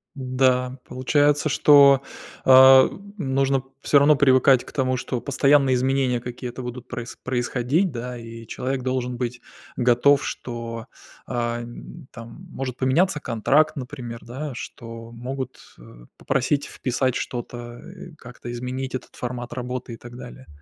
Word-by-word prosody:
Да, 130 -1 0
получается, 145 +3 +1
что, 140 -2 +6 0.4
а, 130 0 +8 0.3
нужно 135 -3 +1 0.2
всё 145 - +4
равно 150 +2 +5
привыкать 130 -2 +4
к - - -12
тому, 130 -2 0
что 125 -1 -4
постоянные 140 -1 +3
изменения 130 -1 +1
какие-то 125 +1 -7
будут 125 0 -7
проис 120 -1 -7
происходить, 130 +7 0
да. 125 0 -6
И 115 0 -10
человек 130 0 -3
должен 125 -1 -2
быть 125 0 -3 0.4
готов, 125 +3 +3
что, 115 -2 -6 0.4
а, 120 -1 -2
н 125 +5 -11
там 115 +10 -11
может 130 -4 -5
поменяться 150 +5 +2
контракт, 140 +6 +2
например, 125 -3 -7
да, 140 +5 -6
что 115 -1 -9
могут, 130 +2 -6 0.2
э, - - -15
попросить 140 +2 0
вписать 130 -1 -1
что-то, 120 -1 -6
э, 180 -2 -11
как-то 125 -1 -10
изменить 130 +2 -4
этот - - -8
формат 120 -1 -5
работы 125 -1 -5
и - - -8
так 120 0 -12
далее. - - -11
130 Hz, 135 wpm, -23 LUFS, 120-135 Hz, 0.4 s, а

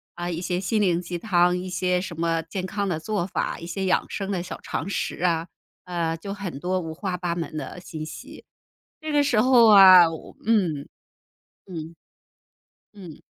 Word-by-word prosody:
啊， 175 0 -4
一 170 -1 -3
些 180 0 -2
心 210 +3 0
灵 175 -4 +2
鸡 175 0 -5
汤， 180 -3 +2
一 180 +1 -4
些 180 0 0
什 175 -3 -7
么 165 -1 +1
健 185 +2 -5
康 200 +1 -2
的 165 -3 -1
做 185 +1 -2
法， - - -3
一 170 - -8
些 190 +3 -3
养 185 - +1
生 195 -1 -4
的 185 -3 -1
小 175 - -7
常 170 - -4
识 200 - -3
啊， 165 -2 +1 0.4
呃， 170 -2 -2
就 195 +4 -6
很 195 -8 -6
多 185 +4 -1
五 160 -2 -6
花 185 +1 -3
八 175 -1 -3
门 165 -2 -5
的 155 +3 -6
信 160 -2 -7
息， 155 - -10 0.6
这 310 -1 -5
个 290 -1 +3
时 265 -6 +2
候 240 -1 +6
啊， 185 -4 +9
我 160 -1 -9
嗯。 180 -11 +1 0.8
嗯。 165 -3 -7 1.0
嗯。 180 -7 -12
180 Hz, 200 characters per minute, -24 LUFS, 170-195 Hz, 1.0 s, 啊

